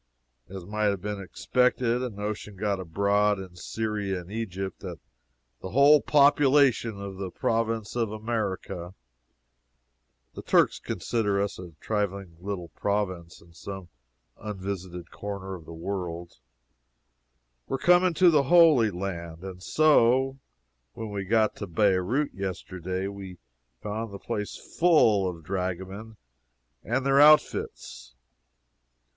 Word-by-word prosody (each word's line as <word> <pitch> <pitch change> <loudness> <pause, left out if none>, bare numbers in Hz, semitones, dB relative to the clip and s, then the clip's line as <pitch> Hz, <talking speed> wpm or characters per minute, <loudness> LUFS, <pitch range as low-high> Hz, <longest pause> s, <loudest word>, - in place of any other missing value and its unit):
As 95 -2 -8
might 105 +2 -2
have 100 -3 +1
been 105 -1 -4
expected, 125 +4 +1
a 125 - -2
notion 105 0 -5
got 100 0 -1
abroad 100 +4 +1
in 95 -2 -9
Syria 100 -1 -3
and 90 +3 -13
Egypt 95 -4 -4
that - - -7 0.6
the 95 - -6
whole 140 +7 +6
population 140 -6 +4
of 100 -1 -7
the 95 -1 -4
Province 115 +2 -1
of 115 -3 0
America 105 -5 -4 1.4
(the - - -7
Turks - - +3
consider 105 -4 -1
us 100 -2 -2
a 90 -2 -9
trifling 100 -4 -3
little 90 -2 -5
province 95 -6 -3
in 85 0 -20
some 95 0 -8 0.5
unvisited 95 -4 -6
corner 100 -2 -6
of 85 -4 -9
the - - -11
world,) 85 -3 -5 1.3
were - - -1
coming 175 +3 +4
to 180 0 +6
the 150 -3 +4
Holy 160 -8 +6
Land 85 -3 -6
and 95 -1 -8
so, 135 - +3 0.5
when 110 -2 -6
we 100 -1 -4
got 110 +1 +2
to 100 - -5
Beirout 100 - +1
yesterday, 95 -1 -4
we 100 -2 -8 0.5
found 110 +1 -4
the 100 - -7
place 105 +1 -4 0.2
full 115 - +4
of 85 -2 -9
dragomen 95 +4 -4 0.7
and 130 +3 -1
their 135 +1 +5
outfits. 145 - +2
100 Hz, 125 wpm, -27 LUFS, 95-115 Hz, 1.4 s, whole